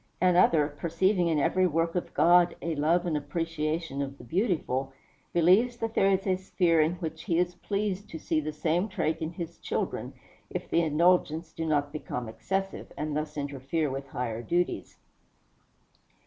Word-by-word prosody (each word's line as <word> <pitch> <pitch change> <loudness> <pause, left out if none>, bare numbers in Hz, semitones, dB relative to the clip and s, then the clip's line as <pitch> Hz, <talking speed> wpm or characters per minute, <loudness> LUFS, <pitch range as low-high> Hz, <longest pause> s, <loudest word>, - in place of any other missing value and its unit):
Another, 175 -4 +4
perceiving 170 +5 +1
in 160 -2 +2
every 185 +5 +3
work 165 0 0
of 180 - -3
God 175 0 +5
a 165 - -2
love 160 +4 +2
and 170 -3 0
appreciation 155 -1 -2
of 140 0 -4
the - - -12
beautiful, 160 - -1 0.4
believes 190 +9 +4
that 225 -1 -3
there 195 - +4
is 190 0 +1
a 185 -2 +2
sphere 175 -3 +2
in 160 +3 +1
which 160 -2 -6
he 170 -5 +1
is 180 0 +1
pleased 200 +1 -3
to 165 - -6
see 160 0 0
the 155 0 -3
same 170 +6 0
trait 165 -4 -1
in 160 +1 -3
his 170 -1 -7
children, - - -3 0.4
if - - -5
the 170 - +2
indulgence 165 0 +2
do 165 0 -3
not 145 -1 0
become 125 -5 -4
excessive, 195 +13 -3
and 150 0 -2
thus 150 0 -3
interfere 140 +2 -2
with 135 +1 -5
higher 120 -3 -3
duties. 175 +9 -1
165 Hz, 170 wpm, -28 LUFS, 150-180 Hz, 0.4 s, God